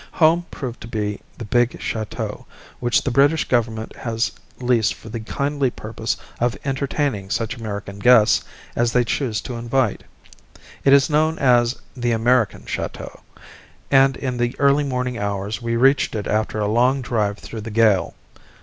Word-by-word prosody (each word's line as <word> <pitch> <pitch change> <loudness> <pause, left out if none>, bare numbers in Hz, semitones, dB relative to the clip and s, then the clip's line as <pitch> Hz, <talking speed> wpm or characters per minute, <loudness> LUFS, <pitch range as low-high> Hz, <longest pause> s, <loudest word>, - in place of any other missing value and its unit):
"Home" 170 +2 +3
proved 125 -4 -6
to - - -8
be 105 -2 -3 0.2
the 115 - -6
big 120 +3 +1
chateau 110 -2 -4 0.3
which 120 -1 +2
the 135 - -1
British 140 +4 +3
Government 115 -2 -1
has 115 -1 -1 0.3
leased 120 -4 +2
for 110 - -12
the 115 +1 -4
kindly 140 +4 -1
purpose 110 -1 -4 0.2
of 120 0 0
entertaining 135 -6 -1
such 115 +4 -1
American 100 -3 -6
guests 115 -1 +5 0.3
as 120 0 +1
they 125 - +4
choose 115 -3 -1
to 125 - -6
invite. 120 -1 0 0.8
It 135 - +4
is 140 -1 +6
known 155 +1 +2
as 120 -2 +3 0.2
the 120 -2 0
"American 120 0 +1
Chateau," - - -5 0.7
and 135 -1 +5
in 130 -2 -3
the 120 0 -1
early 140 +1 +4
morning 125 -3 -2
hours 100 +2 -3
we 115 0 -1
reached 135 +1 +3
it 105 - -3
after 110 0 -1
a 105 - 0
long 125 +5 +2
drive 105 -4 0
through 110 0 -8
the 110 - -6
gale. 110 -3 +2
120 Hz, 160 wpm, -21 LUFS, 110-135 Hz, 0.8 s, is